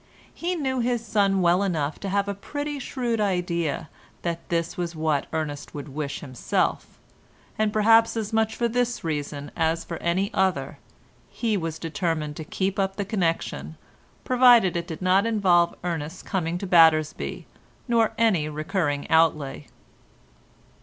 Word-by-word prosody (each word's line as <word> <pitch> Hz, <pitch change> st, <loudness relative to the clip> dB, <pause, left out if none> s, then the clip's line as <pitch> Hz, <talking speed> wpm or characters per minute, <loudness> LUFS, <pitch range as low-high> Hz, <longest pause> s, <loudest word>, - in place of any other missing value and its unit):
He 355 Hz, +2 st, -2 dB
knew 265 Hz, -5 st, -1 dB
his 240 Hz, -1 st, 0 dB
son 195 Hz, -3 st, +2 dB
well 175 Hz, +2 st, +4 dB
enough 155 Hz, -7 st, -1 dB
to 195 Hz, -, -4 dB
have 200 Hz, +1 st, +1 dB
a 200 Hz, -, -1 dB
pretty 290 Hz, +8 st, -5 dB
shrewd 240 Hz, -4 st, -2 dB
idea 175 Hz, -6 st, -1 dB, 0.4 s
that 170 Hz, -1 st, -2 dB
this 170 Hz, -1 st, -1 dB
was 175 Hz, -1 st, -3 dB
what 155 Hz, -3 st, 0 dB
Ernest 150 Hz, -3 st, -4 dB
would 145 Hz, 0 st, -6 dB
wish 140 Hz, 0 st, -4 dB
himself, 130 Hz, -6 st, -2 dB, 0.6 s
and 215 Hz, -1 st, +1 dB
perhaps 225 Hz, +2 st, +4 dB
as 220 Hz, 0 st, -3 dB
much 220 Hz, 0 st, +1 dB
for 235 Hz, -, +1 dB
this 245 Hz, +1 st, -1 dB
reason 145 Hz, -2 st, -4 dB
as 165 Hz, +1 st, 0 dB
for 170 Hz, -, -6 dB
any 185 Hz, +5 st, 0 dB
other 180 Hz, -8 st, 0 dB, 0.5 s
he 225 Hz, -3 st, -1 dB
was 165 Hz, -4 st, -3 dB
determined 160 Hz, -2 st, -2 dB
to 160 Hz, -, -5 dB
keep 190 Hz, +5 st, -2 dB
up 195 Hz, 0 st, 0 dB
the 200 Hz, -, -3 dB
connection, 165 Hz, -, -2 dB, 0.5 s
provided 245 Hz, -7 st, +5 dB
it 170 Hz, 0 st, -2 dB
did 165 Hz, 0 st, -6 dB
not 190 Hz, +4 st, +3 dB
involve 180 Hz, -6 st, +3 dB
Ernest's 165 Hz, 0 st, -4 dB
coming 175 Hz, -3 st, -2 dB
to 195 Hz, -, -5 dB
Battersby 160 Hz, -4 st, +3 dB, 0.4 s
nor 230 Hz, -2 st, +2 dB
any 190 Hz, -10 st, +2 dB
recurring 155 Hz, -1 st, -2 dB
outlay. 155 Hz, -, +2 dB
175 Hz, 150 wpm, -25 LUFS, 160-215 Hz, 0.6 s, provided